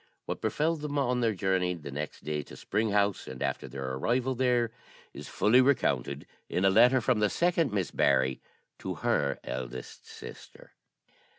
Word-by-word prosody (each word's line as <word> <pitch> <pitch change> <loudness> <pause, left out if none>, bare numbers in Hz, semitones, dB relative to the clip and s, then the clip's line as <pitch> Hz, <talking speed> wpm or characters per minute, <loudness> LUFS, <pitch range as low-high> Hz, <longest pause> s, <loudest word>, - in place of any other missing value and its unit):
What - - -4
befell 160 +2 +1
them 145 -1 -4
on 125 -3 +1
their 115 -3 +1
journey 95 -1 0
the 75 -4 -8
next 75 +2 -6
day 75 -1 -2
to - - -12
Spring 110 +1 -1
House, 100 -1 +1
and 65 - -5
after - - -2
their 65 +1 -6
arrival 120 - 0
there, 125 -2 +1 0.4
is - - -8
fully 120 +5 +4
recounted 125 - +1 0.2
in 90 - 0
a 95 - +5
letter 125 +5 +6
from 120 -1 +2
the 105 -1 +3
second 170 - +1
Miss 100 -4 -1
Barry 65 0 +2 0.4
to - - -4
her 70 -1 +1
eldest 65 -1 -7
sister. - - -12
105 Hz, 170 wpm, -29 LUFS, -, 0.4 s, letter